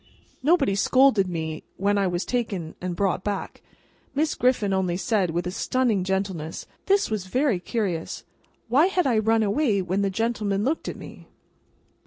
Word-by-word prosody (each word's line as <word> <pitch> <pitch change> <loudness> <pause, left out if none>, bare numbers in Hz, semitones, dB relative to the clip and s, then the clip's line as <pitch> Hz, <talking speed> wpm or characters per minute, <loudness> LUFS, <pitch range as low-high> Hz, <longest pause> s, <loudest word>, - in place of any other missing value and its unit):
Nobody 285 - +3
scolded 220 -1 +4
me 160 -3 -4
when 200 +1 +1
I 195 - +2
was 175 0 -2
taken 200 -10 -2
and 180 -1 -3
brought 190 0 0
back; 205 -1 -4 0.5
Miss 300 +2 +1
Griffin 240 -6 +1
only 185 -2 0
said, 200 -3 +1
with 170 +2 -2
a 180 - -2
stunning 230 -1 0
gentleness, 190 -4 -3 0.2
This 395 - +2
was 200 -4 -2
very 250 -1 +1
curious! 185 -5 -3 0.4
Why 275 +9 +4
had 370 -2 +1
I 240 -5 +3
run 225 +1 +2
away 215 0 +1
when 185 +2 -1
the 200 - +1
gentleman 210 -1 -1
looked 295 +7 -1
at - - -4
me? - - -11
200 Hz, 165 wpm, -25 LUFS, 185-245 Hz, 0.5 s, scolded